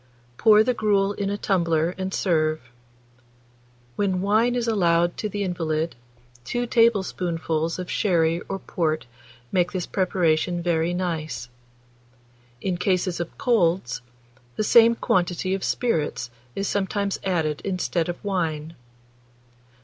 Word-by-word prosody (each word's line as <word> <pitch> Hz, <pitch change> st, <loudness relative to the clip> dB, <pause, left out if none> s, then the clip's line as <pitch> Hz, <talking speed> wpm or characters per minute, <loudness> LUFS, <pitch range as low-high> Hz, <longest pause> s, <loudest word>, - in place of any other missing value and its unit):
Pour 215 Hz, -, +6 dB
the 250 Hz, -, +1 dB
gruel 205 Hz, -3 st, +1 dB
in 200 Hz, -1 st, -2 dB
a 205 Hz, -, -2 dB
tumbler 170 Hz, -4 st, +1 dB
and 190 Hz, 0 st, -4 dB
serve. 155 Hz, -5 st, +1 dB, 1.4 s
When 190 Hz, -3 st, 0 dB
wine 220 Hz, +5 st, +2 dB
is 240 Hz, -1 st, -1 dB
allowed 175 Hz, -5 st, +2 dB
to 215 Hz, -, -2 dB
the 205 Hz, 0 st, -2 dB
invalid, 165 Hz, -3 st, -2 dB, 0.5 s
2 240 Hz, -, -2 dB
tablespoonfuls 180 Hz, -8 st, +1 dB
of 180 Hz, -1 st, -5 dB
sherry 170 Hz, -4 st, +2 dB
or 195 Hz, -, -2 dB
port 160 Hz, -4 st, -2 dB, 0.5 s
make 180 Hz, -1 st, +2 dB
this 185 Hz, -2 st, -2 dB
preparation 175 Hz, -2 st, +1 dB
very 170 Hz, -1 st, +1 dB
nice. 155 Hz, -, -3 dB, 1.1 s
In 185 Hz, -2 st, -1 dB
cases 180 Hz, -1 st, 0 dB
of 170 Hz, -, -5 dB
colds, 175 Hz, -, +1 dB, 0.5 s
the -, -, 0 dB
same 230 Hz, +2 st, +6 dB
quantity 180 Hz, -2 st, 0 dB
of 195 Hz, -, -2 dB
spirits 155 Hz, -, -1 dB, 0.2 s
is 195 Hz, -, -2 dB
sometimes 200 Hz, 0 st, -1 dB
added 160 Hz, -5 st, 0 dB
instead 180 Hz, -3 st, -1 dB
of 175 Hz, -, -3 dB
wine. 165 Hz, -5 st, -2 dB
180 Hz, 125 wpm, -24 LUFS, 165-200 Hz, 1.4 s, Pour